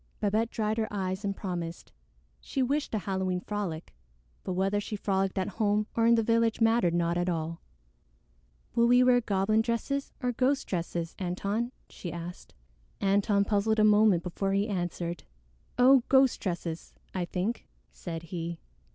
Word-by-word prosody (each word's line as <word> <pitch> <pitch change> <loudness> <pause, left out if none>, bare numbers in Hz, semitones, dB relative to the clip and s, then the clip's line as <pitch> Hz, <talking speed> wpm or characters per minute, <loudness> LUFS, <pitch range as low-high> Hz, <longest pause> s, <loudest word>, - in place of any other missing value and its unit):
Babette 215 +2 +1
dried 220 0 -1
her 220 - 0
eyes 190 0 -3
and 200 -1 -1
promised. 175 -4 -5 0.5
She 270 - -2
wished 280 -1 -1
a - - +2
Halloween 190 -2 -1
frolic, 185 -5 -4 0.5
but 185 - -3
whether 195 +3 +1
she 210 - -5
frolicked 195 -1 -1
at 185 - 0
home 210 0 +2
or 230 0 +3
in 235 - +6
the 225 - +2
village 230 0 +2
mattered 225 -6 +3
not 170 0 +1
at 175 +1 0
all. 165 -1 -3 1.1
"Will 235 0 +4
we 245 +1 +6
wear 250 -1 +5
goblin 215 0 +2
dresses 240 +5 -2
or 250 -1 0
ghost 265 +3 +1
dresses, 170 -1 -3
Antone?" 200 +6 -2 0.2
she 175 - -7
asked. 170 +1 -8 0.4
Antone 200 +1 +2
puzzled 215 +1 +1
a 215 - +4
moment 210 -4 +5
before 195 +2 -2
he 200 +2 +1
answered. 175 -4 -3 0.5
"Oh, 260 +1 +7
ghost 265 -1 +5
dresses, 170 -3 -4 0.2
I 180 -2 -1
think," 195 +7 -3 0.2
said 165 - -6
he. 170 0 -5
200 Hz, 160 wpm, -29 LUFS, 180-225 Hz, 1.1 s, Oh